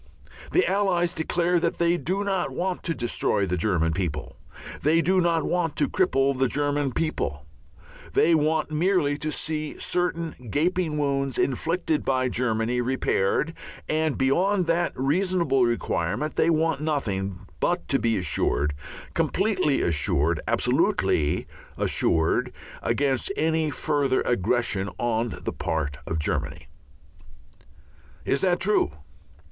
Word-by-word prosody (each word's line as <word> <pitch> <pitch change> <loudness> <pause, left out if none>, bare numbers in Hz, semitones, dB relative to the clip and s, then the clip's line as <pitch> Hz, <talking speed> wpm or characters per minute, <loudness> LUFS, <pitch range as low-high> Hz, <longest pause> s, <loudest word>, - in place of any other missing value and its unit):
The 370 - +3
Allies 180 -3 +1
declare 175 +2 +1
that 165 0 -1
they 170 0 +2
do 185 +5 -1
not 195 -2 -1
want 185 0 -2
to 165 - -1
destroy 115 -4 0
the 90 -1 -1
German 85 -3 +1
people, 80 -4 -3 0.5
they 155 +3 +3
do 185 +2 +3
not 165 -2 +2
want 175 -3 -1
to - - +1
cripple 140 -7 +1
the 130 +1 +2
German 145 +1 0
people; 70 - -2 0.7
they 170 - +4
want 155 0 +1
merely 155 -2 +2
to 155 - -2
see 155 -1 -3
certain 165 -7 -2
gaping 165 - 0
wounds 140 -2 0
inflicted 160 +3 0
by 130 -1 +1
Germany 120 0 0
repaired, 130 +2 0 0.3
and 155 -1 0
beyond 180 +8 +2
that 170 +1 +1
reasonable 165 -1 +2
requirement 115 - -1
they 165 - +3
want 160 -2 +1
nothing 100 - -2 0.2
but 175 0 0
to 135 - +2
be 115 -2 +1
assured, 75 -4 0 0.4
completely 185 -8 +1
assured, 80 0 +1
absolutely 75 -1 +1 0.3
assured, 80 -1 +1 0.3
against 130 - 0
any 160 0 +1
further 145 -3 0
aggressions 110 -2 0
on 115 0 -1
the - - -3
part 80 -4 -2
of 80 - -2
Germany. 75 - -2 1.6
Is 140 - +1
that 180 -2 +2
true? 205 - +2
145 Hz, 125 wpm, -25 LUFS, 115-170 Hz, 1.6 s, they